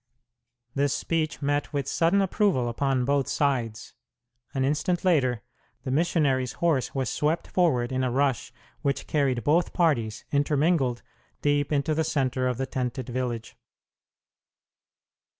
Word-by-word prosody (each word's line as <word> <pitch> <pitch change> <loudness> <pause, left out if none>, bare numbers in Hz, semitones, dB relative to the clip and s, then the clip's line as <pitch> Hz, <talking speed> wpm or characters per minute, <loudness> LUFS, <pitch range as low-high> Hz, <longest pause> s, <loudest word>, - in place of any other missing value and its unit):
This 140 0 +1
speech 155 -2 -2
met 145 +1 0
with 140 -2 -1
sudden 175 +7 +2
approval 190 - +1
upon 130 +1 0
both 140 0 +1
sides. 120 -6 -1 0.6
An 135 -1 0
instant 150 +6 0
later 130 -10 +2 0.4
the 130 - -3
missionary's 140 -5 +1
horse 160 -7 0
was 135 -2 0
swept 155 +7 0
forward 130 -10 +1
in 130 0 0
a 130 - +1
rush 135 -1 0 0.3
which 140 -1 -1
carried 135 -5 0
both 165 +4 +2
parties, 120 -11 +1
intermingled, 145 -3 +1 0.4
deep 145 0 +1
into 145 +1 +1
the 160 +1 +1
center 130 -4 0
of 125 -2 -1
the 135 - -1
tented 125 -1 -3
village. 120 -2 -3
140 Hz, 135 wpm, -26 LUFS, 130-155 Hz, 0.6 s, sudden